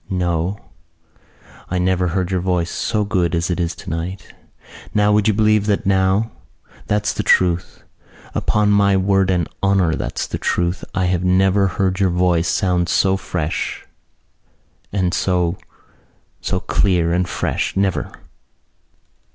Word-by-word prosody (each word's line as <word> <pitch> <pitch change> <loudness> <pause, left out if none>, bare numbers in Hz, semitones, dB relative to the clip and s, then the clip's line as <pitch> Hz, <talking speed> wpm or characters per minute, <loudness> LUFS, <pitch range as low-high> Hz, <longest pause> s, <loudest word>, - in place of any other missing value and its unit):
No, 90 +1 -1 1.1
I 90 - -1
never 90 0 +1
heard 90 +1 -1
your 95 - +1
voice 90 -1 -1
so 105 -2 -1
good 90 -4 0
as 85 +1 -1
it 90 - -2
is 85 -1 -1
tonight. 85 +4 -6 0.6
Now! 105 0 +3
Would 105 0 +3
you 110 - +3
believe 105 -1 +3
that 105 +1 0
now? 95 +3 +2 0.6
That's 105 0 0
the - - -2
truth. 90 -1 +1 0.5
Upon 105 -1 +1
my 100 -1 +4
word 95 0 +2
and 90 -4 +1
honour 95 -4 +2
that's - - -3
the - - -5
truth. 85 +1 -1
I 95 -1 +1
never 95 +2 +2
heard 95 0 -1
your 95 -2 +3
voice 90 -1 +1
sound 90 -2 +1
so 95 0 +3
fresh 90 -4 -3 1.1
and 95 -3 0
so... 90 -1 0 0.8
so - - -1
clear 85 -4 +1
and 90 +1 0
fresh, - - -2
never." 95 -1 0
95 Hz, 135 wpm, -19 LUFS, 90-100 Hz, 1.1 s, my